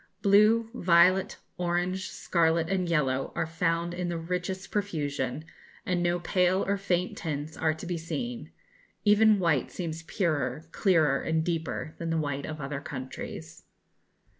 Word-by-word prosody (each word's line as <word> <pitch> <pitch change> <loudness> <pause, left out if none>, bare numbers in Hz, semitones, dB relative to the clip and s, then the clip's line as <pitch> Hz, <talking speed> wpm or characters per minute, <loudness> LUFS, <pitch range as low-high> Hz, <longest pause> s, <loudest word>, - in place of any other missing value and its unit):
Blue, 215 +3 +5
violet, 185 -2 +4 0.2
orange, 180 +2 -1
scarlet, 165 -1 +1
and 185 -2 0
yellow 135 -5 +1
are - - 0
found 165 +1 -1
in 175 0 -3
the 170 - -2
richest 180 +3 -4
profusion, 150 - -2 0.4
and 180 -1 0
no 175 0 +1
pale 180 +2 +2
or 200 - +1
faint 185 -2 -1
tints 150 -1 -4
are 160 -1 +1
to 160 - -8
be 175 -1 -3
seen. 240 +8 -5 0.5
Even 210 +1 +6
white 165 -8 +1
seems 165 -3 -5
purer, 155 - -1
clearer, 160 -8 +3
and 160 0 0
deeper 160 -2 -3
than 165 - -3
the 165 - +1
white 140 -3 -2
of 155 0 -6
other 140 0 -4
countries. 130 -2 -7
170 Hz, 145 wpm, -28 LUFS, 155-185 Hz, 0.5 s, Even